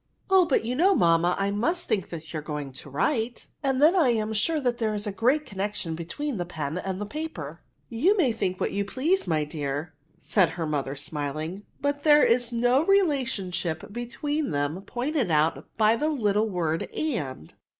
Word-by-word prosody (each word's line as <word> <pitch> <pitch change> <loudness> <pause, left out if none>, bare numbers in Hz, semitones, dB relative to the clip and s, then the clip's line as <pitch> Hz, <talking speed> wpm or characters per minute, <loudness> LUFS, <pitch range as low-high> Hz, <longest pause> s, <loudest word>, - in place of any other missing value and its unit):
^' - - -49 0.3
Oh, 380 -2 +6
but 265 - +2
you 240 - -1
know, 375 +7 +4
mamma, 170 - +3
I 195 0 0
must 335 - 0
think 195 -4 -1
you 160 -1 -5
are - - -7
going 150 -2 -5
to 130 - -10
write, 225 - -1 0.2
and 270 -3 0
then 310 +6 +6
I 320 -9 +4
am 220 -2 0
sure 310 +9 +1
there 240 -5 0
is 205 +1 -3
a 205 - -2
great 255 +9 +2
connection 195 -3 -3
between 205 - -4
the 175 - -1
pen 155 -1 -4
and 190 0 -4
the 210 - -3
paper.'* 200 - -6 0.3
'^Tou 335 - +3
may 290 -10 +3
think 185 -5 -2
what - - 0
you 200 - 0
please, 300 - 0
my 155 -2 +1
dear,'' 150 +1 -4 0.3
said 180 0 +2
her 165 - -1
mother, 140 -3 -2
smiling, 155 +6 -5
'* - - -36
but 285 0 0
there 295 -1 +6
is 245 0 +3
no 245 +4 +3
relationship 245 - 0
between 290 +6 -2
them 145 +4 -1
pointed 255 - -1
out 155 0 +1
by 220 0 +4
the 300 +6 0
little 215 -6 +1
word 165 -4 -1
and. 145 - -3
210 Hz, 190 wpm, -26 LUFS, 165-275 Hz, 0.3 s, Oh